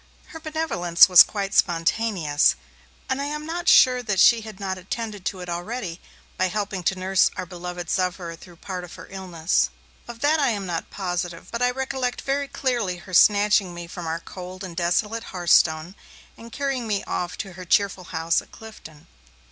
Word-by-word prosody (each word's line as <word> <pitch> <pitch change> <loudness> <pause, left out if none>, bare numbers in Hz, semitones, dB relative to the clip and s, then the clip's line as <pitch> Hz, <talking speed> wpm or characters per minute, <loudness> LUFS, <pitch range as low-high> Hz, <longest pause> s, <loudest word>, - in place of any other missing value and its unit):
Her 325 -2 -9
benevolence 310 - +3
was 180 -2 +9
quite 200 -2 +1
spontaneous; 170 -3 +2 0.5
and 265 +1 -1
I - - -2
am 300 +1 -4
not 345 +2 -1
sure 250 -1 +6
that 210 -6 -1
she 230 +3 +6
had 215 -2 -10
not 190 -2 -3
added 205 +1 -6
to 190 -2 -3
it 180 - -7
already 175 +1 -5 0.4
by 185 - +2
helping 195 0 -3
to 190 - +1
nurse 185 0 +3
our 185 - -3
beloved 175 0 -7
sufferer 180 -2 -2
through 175 +1 -15
part 180 +1 -6
of 175 - -10
her - - -11
illness. 165 - 0 0.4
Of 235 -1 -9
that 305 +2 +3
I 285 - +3
am 205 -4 -2
not 170 -2 -4
positive, 180 -2 -4
but 235 - -4
I 245 - +4
recollect 260 -1 -3
very 280 +1 -1
clearly 240 -10 -1
her 185 +2 -13
snatching 205 -1 +4
me 175 0 -7
from 170 0 -7
our 165 +1 -2
cold 185 +2 -9
and 180 -3 -7
desolate 210 +6 0
hearthstone, 170 -1 +2 0.4
and 230 0 -13
carrying 270 -2 -2
me 205 -2 -1
off 175 0 -4
to 195 -3 -6
her 185 +1 -9
cheerful 190 0 +1
house 165 -1 0
at - - -20
Clifton. 215 -9 -13
190 Hz, 185 wpm, -24 LUFS, 175-230 Hz, 0.5 s, was